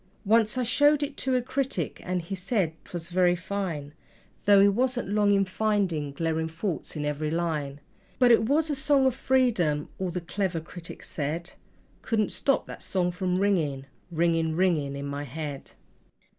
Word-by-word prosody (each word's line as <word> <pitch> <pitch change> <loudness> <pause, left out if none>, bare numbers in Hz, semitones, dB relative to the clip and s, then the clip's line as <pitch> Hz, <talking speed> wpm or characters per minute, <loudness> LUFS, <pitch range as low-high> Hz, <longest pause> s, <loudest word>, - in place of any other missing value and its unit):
Once 220 +2 +3
I 255 - +1
showed 290 +5 +4
it 285 0 -4
to 260 -1 0
a 250 - +1
critic, 260 - -2
and 180 -1 -2
he 170 - -6
said 185 -3 0
'twas 170 -1 -6
very 180 0 +3
fine, 170 -6 -4 0.5
Though 200 -1 +7
he 200 - +7
wasn't 245 +2 0
long 205 0 +3
in 195 -1 +3
finding 190 -7 0
glaring 160 +2 -1
faults 165 +2 -4
in 150 -1 -2
every 150 +1 -1
line; 150 -4 -2 0.4
But 250 -2 +5
it 225 0 +4
was 310 +2 +2
a - - 0
song 275 0 +3
of 260 - +3
Freedom 225 - +1
all 190 -1 -1
the 175 +1 -3
clever 180 0 -2
critic 165 +1 -10
said 160 +4 -4 0.5
Couldn't 215 -3 0
stop 275 - +1
that - - -9
song 180 -2 0
from 180 0 -1
ringing, 160 -9 +1 0.3
ringing, 165 -1 +1
ringing 160 -6 +1
in 140 0 -5
my 140 0 -4
head. 145 0 -6
180 Hz, 170 wpm, -27 LUFS, 160-220 Hz, 0.5 s, Though